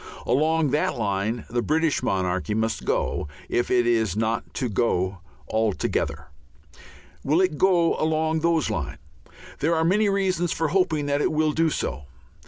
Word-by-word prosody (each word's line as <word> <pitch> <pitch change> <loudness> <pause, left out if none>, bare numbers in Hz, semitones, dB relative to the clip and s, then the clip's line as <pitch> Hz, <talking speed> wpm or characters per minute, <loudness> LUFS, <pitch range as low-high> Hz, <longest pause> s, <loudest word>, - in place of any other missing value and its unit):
Along 155 +1 +2
that 150 0 +1
line 105 +1 -1
the 120 +1 -1
British 160 +3 +1
monarchy 95 +2 -1
must 110 0 -1
go - - -1 0.2
if 120 - 0
it 120 -1 +3
is 110 -4 +1
not 110 +1 -1
to 130 - -1
go 95 -4 0 0.3
altogether. 110 -2 -1 0.9
Will 150 +5 +2
it 185 -6 +1
go 175 -3 +3
along 160 0 +1
those 165 -2 +1
lines? - - -3 0.6
There 165 +3 +1
are 160 0 +1
many 205 +4 +3
reasons 185 -4 0
for 160 -2 0
hoping 160 -4 +1
that 145 0 0
it - - +1
will 155 0 +2
do 165 +2 +2
so. 70 - -3
150 Hz, 155 wpm, -24 LUFS, 110-165 Hz, 0.9 s, it